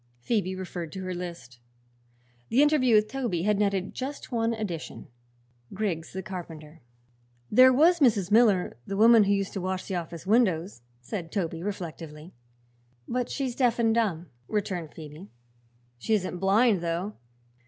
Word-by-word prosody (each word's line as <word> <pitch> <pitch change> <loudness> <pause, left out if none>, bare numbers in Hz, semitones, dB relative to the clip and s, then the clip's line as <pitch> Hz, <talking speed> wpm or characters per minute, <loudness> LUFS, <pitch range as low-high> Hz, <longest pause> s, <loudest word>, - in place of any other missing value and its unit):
Phoebe 190 - -1
referred 175 -3 -6
to 190 - -6
her 185 0 -3
list. 170 -9 -8 0.9
The 265 +5 +4
interview 280 -6 +4
with 215 0 +4
Toby 235 -10 -2
had 210 0 +1
netted 195 -2 0
just 270 +2 -6
one 230 -1 +1
addition 210 -8 -5 0.7
Griggs 185 -6 -2
the 190 0 -5
carpenter. 165 -4 -9 0.7
"There 255 +4 +7
was 330 +7 +4
Mrs. 210 - +3
Miller, 210 - +4
the 195 - -3
woman 225 0 +7
who 200 - +1
used 200 -1 0
to 195 - -3
wash 185 0 -3
the - - -4
office 170 0 -7
windows," 185 - +1 0.2
said 165 - -6
Toby 165 -5 -2
reflectively. 165 -4 -7 0.7
"But 250 0 -2
she's 265 -3 -2
deaf 245 -3 +2
and 225 -2 +2
dumb," 200 -8 0 0.2
returned 185 -7 -3
Phoebe. 155 +4 -10 0.7
"She 220 - +1
isn't 185 -3 -3
blind, 200 +1 +3
though. 175 +5 -2
195 Hz, 150 wpm, -27 LUFS, 170-225 Hz, 0.9 s, There